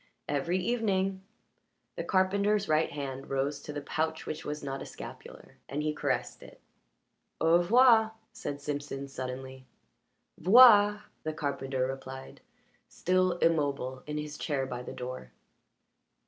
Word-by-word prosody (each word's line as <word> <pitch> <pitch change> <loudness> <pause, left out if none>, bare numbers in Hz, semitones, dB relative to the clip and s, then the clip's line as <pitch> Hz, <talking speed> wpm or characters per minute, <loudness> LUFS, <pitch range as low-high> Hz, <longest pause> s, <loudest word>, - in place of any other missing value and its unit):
"Every 145 +5 0
evening." 195 -2 0 0.7
The - - -3
carpenter's 200 +2 +2
right 155 +1 +2
hand 135 -2 -6
rose 140 +1 -1
to - - -7
the 145 -1 -5
pouch 160 +2 -2
which 155 - -5
was 150 0 -5
not 135 -1 -4
a - - -6
scapular - - -11
and 145 +2 -2
he 155 0 0
caressed 150 - -2
it. - - -14 0.8
"Au 165 +2 +5
revoir," 220 +3 +5 0.2
said 145 0 -5
Simpson 145 -1 -4
suddenly. 130 0 -7 0.7
"'Voir," 210 0 +7 0.2
the 155 - -3
carpenter 135 -3 -2
replied, 135 - -7 0.5
still 185 0 +1
immobile 145 -6 0
in 150 0 -3
his 150 0 -5
chair 140 -4 -1
by 125 -2 -5
the - - -7
door. 125 - -7
150 Hz, 135 wpm, -30 LUFS, 135-185 Hz, 0.8 s, Voir